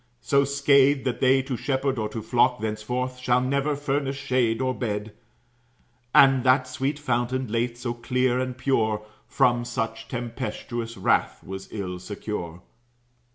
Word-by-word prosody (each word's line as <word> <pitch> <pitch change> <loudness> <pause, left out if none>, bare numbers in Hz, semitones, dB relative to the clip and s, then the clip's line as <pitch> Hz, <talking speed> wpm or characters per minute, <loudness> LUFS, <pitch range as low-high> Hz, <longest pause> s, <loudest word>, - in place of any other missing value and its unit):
So 140 -1 +3
scathed, 140 0 +4
that 125 -3 -1
they 130 0 +4
to 130 -1 -3
shepherd 135 +1 -1
or 105 -1 -2
to 110 - -6
flock 125 +2 +2
Thenceforth 125 +4 -3
shall 125 0 +2
never 140 +3 0
furnish 140 -1 -1
shade 125 -4 +1
or 130 -1 0
bed. 105 -3 -3 1.0
And 135 -1 +6
that 130 0 +4
sweet 135 +3 -2
fountain, 130 -2 -1
late 120 +1 -1
so 120 -1 -3
clear 125 +1 0
and 130 -1 -3
pure, 110 -5 0 0.2
From 120 -1 +2
such 115 -1 -4
tempestous 115 -1 -5
wrath 95 - +1
was 95 0 -7
ill 90 -4 -4
secure. 90 -3 -6
125 Hz, 145 wpm, -25 LUFS, 115-130 Hz, 1.0 s, And